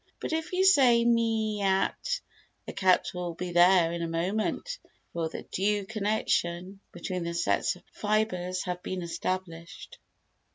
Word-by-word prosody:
But - - -4
if 320 0 -2
you 370 +1 +2
say 250 -10 +6
"Me 225 -2 +1
e - - -4
at," 195 - 0 0.4
the - - -7
cat 185 -3 +3
will 175 -2 -4
be 180 +1 -5
there 175 -1 +5
in 170 - -3
a 170 - -1
moment, 205 - -2 0.3
for 165 -1 -2
the - - -7
due 205 +1 -1
connection 195 -3 -1
between 185 -3 -4
the 170 0 -4
sets 170 - +1
of 180 - -17
fibres 185 -4 -1
has 180 -1 -3
been 185 -1 -4
established. 170 0 -5
185 Hz, 155 wpm, -28 LUFS, 175-220 Hz, 0.4 s, say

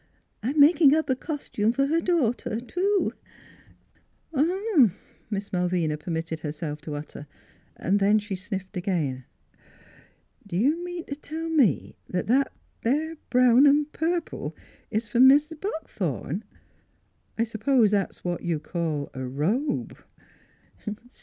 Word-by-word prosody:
I'm 270 +8 -1
making 295 -1 +7
up 315 -3 0
a - - +3
costume 250 -7 -2
for 275 +2 +2
her 325 +4 +1
daughter, 245 -9 0
too." 370 - 0 1.2
"Uh 290 0 +3
huh," 380 - +4 0.4
Miss 200 -2 -4
Malvina 180 -3 +1
permitted 160 0 -4
herself 150 0 -5
to 150 -1 -5
utter. 145 0 -8 0.5
Then 200 +3 +3
she 210 -1 -3
sniffed 190 +1 -6
again. 160 -9 -1 0.6
" - - -27
Do 175 -3 -3
you 295 - +2
.mean 355 -1 -5
t' - - -5
tell 315 +3 -5
me 290 - +2
that 240 +9 +1 0.3
there 305 +7 0
brown 250 +2 +6
an' 290 +1 +4
purple 335 +1 -2 0.3
is 225 +1 -1
for 220 +3 -1
Mis' 285 +5 +6
Buckthorn? 200 - -3 0.9
I 225 - +3
s'pose 225 0 +2
that's 200 -2 -1
what 175 -1 -2
you 170 -3 -1
call 155 -3 -3
a 130 - -5
robe." 180 - -1
225 Hz, 125 wpm, -26 LUFS, 175-295 Hz, 1.2 s, making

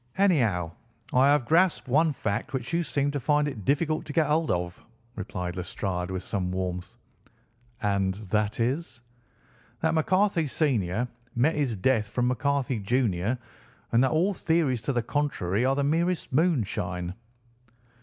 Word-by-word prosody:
"Anyhow, 115 - +2 0.4
I 130 +2 +5
have 145 -3 +3
grasped 170 +3 +3
one 155 +5 +3
fact 110 -5 -3
which 130 +2 -3
you 170 - +2
seem 145 -3 0
to 145 - -2
find 150 +3 +2
it 120 -8 -5
difficult 155 +2 +1
to 145 - -6
get 160 +1 +3
hold 155 +2 +1
of," 90 0 -2 0.3
replied 90 -3 -4
Lestrade 90 0 -3
with 95 -1 -4
some 90 -2 -2
warmth. 90 +2 -4 0.9
"And 100 -2 +1 0.2
that 105 0 0
is—" 130 +1 -1 0.8
"That 160 0 +2
McCarthy 175 +1 +2
senior 120 - 0 0.3
met 135 +7 +3
his 140 -7 0
death 110 +1 +1
from 125 +4 0
McCarthy 130 0 0
junior 110 0 0 0.5
and 120 +2 +4
that 130 - +3
all 175 +7 +2
theories 160 - +1
to - - +2
the 120 -2 0
contrary 120 -7 0
are 135 +1 +2
the 140 - 0
merest 165 +2 0
moonshine." 100 - 0
130 Hz, 150 wpm, -27 LUFS, 100-150 Hz, 0.9 s, I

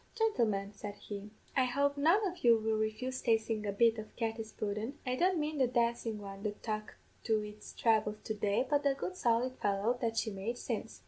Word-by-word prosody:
"'Gintlemen,' 220 - +1
said 205 0 -6
he, 205 0 -7 0.3
'I 260 - +4
hope 280 +3 +1
none 335 +9 +4
of 360 -1 -6
you 235 -1 +7
will 220 0 0
refuse 250 +4 -2
tastin' 220 -2 +1
a - - +1
bit 225 +2 +4
of 215 - -9
Katty's 225 -1 -3
pudden; 215 +6 -3
I 250 0 0
don't 365 +5 +3
mane 300 0 -1
the 260 - +4
dancin' 235 -2 0
one 195 -1 -8
that 210 0 -4
tuck 215 -1 -3 0.3
to 220 -2 +2
its 210 0 -9
thravels 215 -2 +2
to 220 - -2
day, 205 +3 +1
but 290 -1 +2
a 275 - +3
good 365 +6 -4
solid 250 -4 +1
fellow 205 +5 +1
that 225 -2 0
she 220 - +1
med 205 +5 -3
since.' - - -4
225 Hz, 205 wpm, -33 LUFS, 210-255 Hz, 0.3 s, you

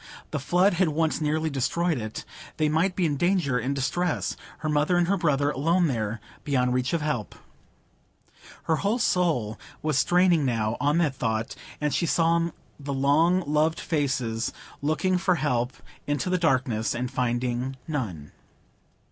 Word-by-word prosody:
The - - -1
flood 180 +8 +3
had 180 +1 +2
once 160 +1 0
nearly 155 +1 0
destroyed 155 +3 0
it. 110 0 -6 0.3
They 155 -1 +2
might 170 +5 +1
be 180 - +1
in 145 -3 0
danger, 175 -7 +1
in 135 +3 -2
distress,—her 155 +2 -2
mother 150 +4 +2
and 175 -1 +2
her 200 - +3
brother, 145 -5 +1
alone 165 +6 +2
there, 110 -6 -1 0.2
beyond 125 -4 +1
reach 125 0 0
of 165 -3 0
help! 135 -9 -2 1.3
Her 160 - +1
whole 205 +7 0
soul 165 - +1 0.2
was 155 -3 +1
strained 175 -1 +4
now 115 -4 0
on 145 +2 +2
that 160 -5 +2
thought; 110 -3 -2 0.3
and 150 -1 0
she 170 - +1
saw 165 +1 +2 0.3
the 140 0 -4
long 155 +7 +3
loved 155 +3 +1
faces 130 -7 -1 0.3
looking 180 +5 +1
for 180 -1 +2
help 125 -5 0 0.3
into 145 +5 -1
the 185 - +2
darkness, 130 -9 +1
and 125 +1 -3
finding 125 0 -1
none. 105 - -4
150 Hz, 155 wpm, -26 LUFS, 125-170 Hz, 1.3 s, strained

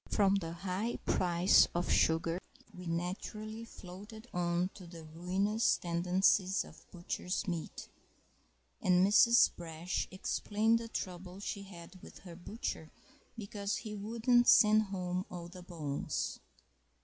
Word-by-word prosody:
From 195 -2 +3
the 165 -4 -1
high 190 +6 -3
price 180 +1 +4
of 175 +1 0
sugar 165 +1 +2 0.4
we 180 -1 -8
naturally 210 +6 -4
floated 210 +2 -11
on 175 +1 0
to 185 -3 -12
the 170 -1 -10
ruinous 185 +7 0
tendencies 180 +2 +2
of 160 - -16
butcher's 180 +1 -4
meat, 170 -3 -4 0.9
and 185 -2 +4
Mrs. 230 +4 +6
Brash 170 +1 -3
explained 215 +4 0
the 230 - -6
trouble 180 -3 -6
she 200 0 -4
had 185 -1 -12
with - - -12
her 175 -3 -10
butcher 175 -3 -5 0.5
because 200 -1 -3
he 215 -2 -6
wouldn't 230 +4 +2
send 215 0 +6
home 185 -2 -3
all 175 -1 -7
the 180 +1 -11
bones. 155 -6 -3
185 Hz, 125 wpm, -33 LUFS, 175-210 Hz, 0.9 s, Mrs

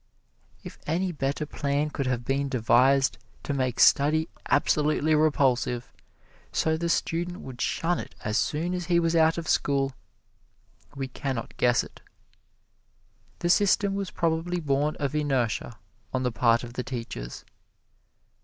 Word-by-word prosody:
If - - -10
any 180 +4 0
better 145 -1 -2
plan 145 0 -1
could 140 -3 -2
have 120 -2 -1
been 140 +2 0
devised 130 +3 +3 0.2
to 145 - -2
make 130 -3 -1
study 155 +3 +4 0.2
absolutely 155 +1 +2
repulsive, 135 -5 +1 0.6
so 160 0 +1
the 170 +1 -2
student 175 +2 -1
would 130 -2 -8
shun 175 +1 0
it - - -8
as 105 0 -1
soon 160 +8 0
as 180 -1 -3
he 175 0 +3
was 165 0 +1
out 160 0 +4
of 165 -2 -4
school, 135 -1 +1 1.0
we 135 -1 -3
can 135 +1 -4
not 115 - -6
guess 120 0 +3
it. - - -14 1.4
The 175 - 0
system 200 0 +3
was 195 -1 -3
probably 170 +1 -1
born 145 -1 0
of 140 -2 -2
inertia 130 -6 -1 0.3
on 130 0 -1
the 125 - 0
part 120 -1 +3
of 120 0 -8
the 125 - -3
teachers. 115 - -6
145 Hz, 145 wpm, -27 LUFS, 130-165 Hz, 1.4 s, study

